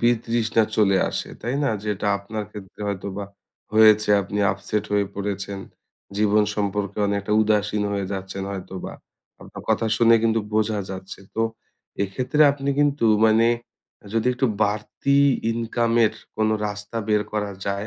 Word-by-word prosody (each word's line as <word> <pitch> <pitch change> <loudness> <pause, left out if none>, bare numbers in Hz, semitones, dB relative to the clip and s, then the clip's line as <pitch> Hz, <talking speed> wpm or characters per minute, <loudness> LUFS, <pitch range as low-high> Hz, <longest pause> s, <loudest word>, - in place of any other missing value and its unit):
বিতৃষ্ণা 115 -1 +2
চলে 100 -3 +4
আসে, - - -4
তাই 120 +3 -2
না? 135 - +2
যেটা 105 -1 -2
আপনার 105 +2 -5
ক্ষেত্রে 100 -1 -11
হয়তোবা 100 0 -4 0.5
হয়েছে, 110 -1 +6
আপনি 100 +2 -4
আপসেট 95 +2 -3
হয়ে 100 -1 +2
পড়েছেন। 100 0 -4 0.6
জীবন 105 0 +3
সম্পর্কে 100 0 -2
অনেকটা 100 +1 -1
উদাসীন 105 -1 +1
হয়ে 100 -1 -2
যাচ্ছেন 95 0 -5
হয়তোবা। 95 -1 -6 0.5
আপনার - - -10
কথা 115 - +2
শুনে 115 0 +6
কিন্তু 115 -1 +2
বোঝা 110 -1 +1
যাচ্ছে। 95 +1 -8
তো 115 - +1 0.6
এইক্ষেত্রে 125 +9 -2
আপনি 140 0 -2
কিন্তু 145 -5 +2 0.2
মানে 110 +1 +5 0.7
যদি 115 +1 0
একটু 130 +1 +1 0.2
বাড়তি 110 +6 0 0.3
ইনকামের 115 -1 +1 0.2
কোনো 110 0 +2
রাস্তা 105 +2 -6
বের 105 -1 +3
করা 105 -1 -1 0.2
যায় 100 +1 -2
105 Hz, 140 wpm, -23 LUFS, 100-115 Hz, 0.7 s, হয়েছে